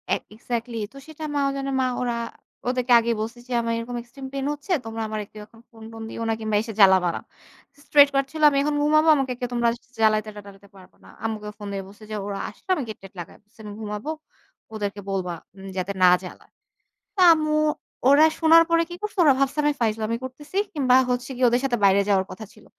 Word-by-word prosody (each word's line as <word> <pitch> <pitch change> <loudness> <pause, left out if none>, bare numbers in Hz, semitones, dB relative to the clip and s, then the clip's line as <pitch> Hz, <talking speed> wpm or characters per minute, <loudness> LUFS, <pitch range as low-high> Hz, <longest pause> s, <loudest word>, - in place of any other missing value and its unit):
এ - - +3 0.2
exactly 235 +1 -4 0.2
তো - - -13
সেটা 315 0 -10
মা - - +1
ও - - +1
জানে, 275 0 -3
মা - - +2 0.2
ওরা 245 -1 -1 0.5
ওদেরকে 250 0 +1
আগেই 230 0 0
বলছি 230 +3 -5
যে 250 - -5
"আমার 230 0 -1
এরকম 235 +1 -5
এক্সট্রিম 255 +3 -11
পেইন 275 -1 -3
হচ্ছে। 295 +6 -9
তোমরা 225 0 -5
আমারে 215 -1 -4
কেউ 215 - -10
এখন 225 +1 -20
ফোন-টোন 225 0 -11
দিও 230 - -5
না - - +2
কিংবা 220 -1 -2
এসে 225 0 -6
জ্বালাবা 190 -3 +6
না।" - - -5 0.6
স্ট্রেইটকাট 280 -2 +5
ছিল, 315 - -6
"আমি 280 - -1
এখন 295 0 0
ঘুমাবো, 310 +2 +3
আমাকে 270 -3 -1
কেউ 245 - -3
তোমরা 235 -1 +2 0.3
জ্বালাইতে-টালাইতে 210 -2 -1
পারবা 185 -1 -17
না।" - - -16
আম্মুকে 215 -2 -3
ফোন 205 -1 -8
দিয়ে 195 -1 -4
বলছি 205 +2 -15
যে, - - -3
"ওরা 200 -1 -4
আসলে - - -20
আমি 295 - -3
গেট-টেট 195 -3 -10
লাগায়ে 175 - -9
বলছি 210 +3 -32
আমি 210 -1 -8
ঘুমাবো, 210 +5 -5 0.6
ওদেরকে 205 -1 -4
বলবা 185 -2 -2 0.4
যাতে 185 +1 -2
না - - +8 0.2
জ্বালায়।" 180 - -11 0.6
তো - - -6
আম্মু, 310 -1 0 0.5
ওরা 290 +3 +7
শোনার 330 0 +7
পরে 335 0 +4
কি - - -7
করছে? 420 0 -5
ওরা 290 -4 +6
ভাবছে 275 +1 0
আমি 295 0 +2
ফাইজলামি 220 0 0
করতেছি 290 +8 -7 0.2
কিংবা 260 -5 +3
হচ্ছে 250 0 -2
গিয়ে 250 +1 +2
ওদের 245 +1 +1
সাথে 245 -3 0
বাইরে 195 +1 +5
যাওয়ার 190 -2 +3
কথা 220 +3 -8
ছিল। - - -19
230 Hz, 210 wpm, -24 LUFS, 210-275 Hz, 0.6 s, না